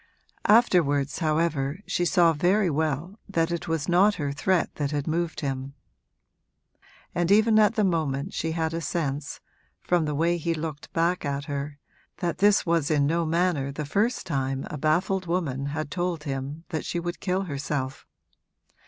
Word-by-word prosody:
Afterwards, 165 - +3
however, 155 -3 0
she 175 - 0
saw 170 -2 +4
very 180 +4 +2
well 160 +6 -2
that 165 -3 +1
it 170 - -3
was 165 -2 -1
not 190 +4 +4
her 145 -2 -2
threat 175 +5 0
that 145 -2 -1
had 145 -1 -2
moved 165 0 -1
him, 135 -1 -4 1.4
and 175 0 0
even 215 +2 +5
at 215 +1 +4
the 215 - +2
moment 160 -2 0
she 160 0 -2
had 160 -1 -1
a 165 - -2
sense, 145 -4 -3 0.4
from 175 -3 +1
the 150 -1 -2
way 170 +3 +2
he 165 0 -1
looked 155 -2 -6
back 170 +2 +1
at 140 -1 -2
her, 145 0 -4 0.4
that 175 -3 -2
this 205 +1 +4
was 165 -4 +1
in 145 -3 +3
no 165 +2 +1
manner 165 -4 +1
the 150 +2 -4
first 210 - 0
time 135 -4 -2
a - - -4
baffled 175 +5 +1
woman 145 -6 -1
had 145 0 -4
told 175 -2 -2
him 140 +2 -4
that 160 -4 -3
she 175 - -2
would 175 0 -4
kill 190 0 0
herself. 140 -4 -4
165 Hz, 170 wpm, -26 LUFS, 145-175 Hz, 1.4 s, even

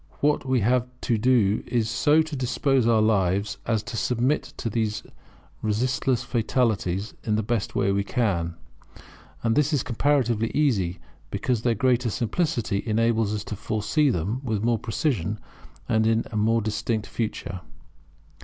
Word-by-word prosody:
What 145 -2 +1
we 130 -2 +2
have 125 +3 +2
to 115 -3 0
do 110 -4 +3
is 115 -3 0
so 145 +7 +3
to 155 -1 -6
dispose 130 -1 +1
our 110 -2 +4
life 100 -1 +1
as 110 -2 +1
to 120 +1 -7
submit 125 +5 +1 0.2
to 120 - -3
these 110 -2 -1 0.6
resistless 120 +3 0
fatalities 110 -5 0
in 105 - 0
the 110 - 0
best 110 0 -2
way 100 - +2
we 100 0 +1
can; 85 -7 -1 0.9
and 115 -1 +2
this 150 +1 +2
is 145 -5 +1
comparatively 120 -3 +1
easy, 100 - +1 0.3
because 110 - -1
their 120 -1 +1
greater 125 +1 +2
simplicity 120 - -1
enables 115 -1 +2
us 105 -1 -2
to 105 - -5
foresee 110 +7 0
them 105 +4 -1
with 110 -5 -2
more 115 -1 +2
precision 110 - -1 0.5
and 110 0 +2
in 115 0 +2
a - - -6
more 110 +1 +2
distinct 110 0 -1
future. 105 -5 -4
115 Hz, 155 wpm, -25 LUFS, 105-125 Hz, 0.9 s, our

